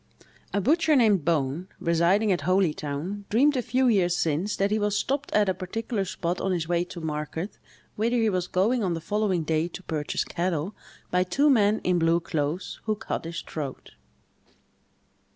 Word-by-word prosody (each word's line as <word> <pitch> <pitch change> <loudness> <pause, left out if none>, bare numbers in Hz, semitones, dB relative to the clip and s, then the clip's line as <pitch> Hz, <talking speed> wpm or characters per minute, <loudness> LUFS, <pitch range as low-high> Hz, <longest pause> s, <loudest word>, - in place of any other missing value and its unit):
A 200 - +1
butcher 310 - +3
named 215 - +4
Bone, 160 +1 0
residing 170 +6 +2
at 180 - +1
Holytown, 180 +1 -1
dreamed 280 +7 +4
a 255 - +1
few 255 +2 +1
years 180 -6 +3
since 165 +6 0
that 200 +1 0
he 215 - +2
was 205 0 +1
stopped 275 +5 -1
at 210 -1 +3
a 190 - +2
particular 200 +3 -3
spot 175 0 -3
on 195 - 0
his 170 -3 -1
way 175 0 +1
to 180 - -9
market, 160 +4 -4 0.4
whither 230 +3 +1
he 225 -1 +2
was 185 -3 0
going 215 +7 +1
on 180 -3 0
the - - -3
following 190 0 0
day 160 +1 0
to 185 +2 -9
purchase 155 -4 -2
cattle, 175 +1 -2 0.4
by 180 0 +3
two 280 +11 +3
men 215 -3 +3
in 180 -1 +2
blue 165 +1 +3
clothes, 160 +1 -3
who 215 -1 +1
cut 210 -5 -4
his 170 0 -5
throat. 145 -4 -6
185 Hz, 180 wpm, -26 LUFS, 165-215 Hz, 0.4 s, named